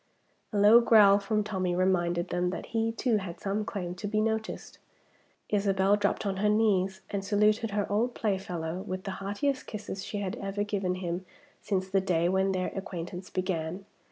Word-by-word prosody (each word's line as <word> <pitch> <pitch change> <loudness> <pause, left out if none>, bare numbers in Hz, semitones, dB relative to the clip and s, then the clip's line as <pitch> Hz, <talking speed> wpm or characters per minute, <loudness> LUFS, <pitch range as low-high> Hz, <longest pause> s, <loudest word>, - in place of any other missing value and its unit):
A 210 - -2
low 210 +4 +7
growl 210 -4 +6
from 210 +1 0
Tommie 185 -4 -1
reminded 175 -2 +1
them 180 0 0
that 180 - -5
he 225 0 +1
too 230 0 +1
had 185 -4 -6
some 200 +2 -1
claim 185 -5 -4
to 195 +3 -5
be 215 +1 0
noticed. 220 0 -2 0.7
Isabel 200 -1 +3
dropped 205 +1 0
on 195 -1 -1
her 210 +2 +2
knees, 195 -3 +2
and 200 -1 -2
saluted 210 +2 +2
her 205 0 0
old 230 +4 0
playfellow 185 -5 -2
with 185 0 -5
the 195 - -4
heartiest 205 +8 -1
kisses 205 -2 -6
she 210 - -5
had 195 -2 -3
ever 200 +1 -2
given 195 -3 -1
him 180 0 -3 0.4
since 190 -3 -1
the 195 0 +2
day 175 -3 +1
when 190 +1 +2
their 185 -1 -1
acquaintance 180 -1 -6
began. 185 0 -3
195 Hz, 180 wpm, -29 LUFS, 185-210 Hz, 0.7 s, low